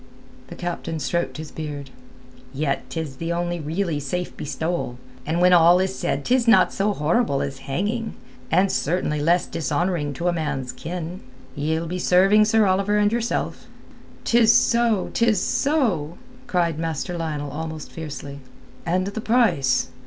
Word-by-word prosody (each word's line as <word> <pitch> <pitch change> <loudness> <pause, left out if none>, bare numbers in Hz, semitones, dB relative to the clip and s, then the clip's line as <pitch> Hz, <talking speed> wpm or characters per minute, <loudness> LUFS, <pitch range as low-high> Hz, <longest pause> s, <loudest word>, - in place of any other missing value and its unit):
The - - -9
captain 170 -2 -4
stroked 170 +3 -2
his 155 0 -7
beard. 145 -3 -6 0.6
"Yet 140 -1 -2
'tis 155 -5 -5
the 165 +3 -3
only 175 0 -1
really 160 +1 -2
safe 175 +6 -4
bestowal, 150 -2 -3 0.3
and 165 +2 0
when 180 0 +5
all 175 +1 +7
is 190 0 0
said 160 -5 -2
'tis 250 -1 +2
not 230 - +5
so 205 +2 +1
horrible 155 - +1
as 135 -1 -5
hanging, 210 - -2 0.3
and 185 +3 +3
certainly 150 -2 0
less 170 +4 +3
dishonouring 160 -1 -1
to 170 +6 -3
a 175 - +2
man's 135 -6 -2
kin. 175 +2 -6 0.4
Ye'ld 160 +3 -1
be 180 +1 -3
serving 195 +4 +5
Sir 220 0 +4
Oliver 195 +2 +2
and 205 0 +3
yourself." 235 0 -2 0.6
"'Tis 230 -1 +5
so, 230 -4 +3
tis 230 -4 +3
so," 200 - 0 0.3
cried 170 -7 0
Master 165 +1 -3
Lionel 150 -4 -3
almost 160 0 -6
fiercely. 145 -3 -7 0.5
"And 185 +2 +1
the 200 +2 -4
price?" 220 - +2
170 Hz, 150 wpm, -23 LUFS, 150-195 Hz, 0.6 s, all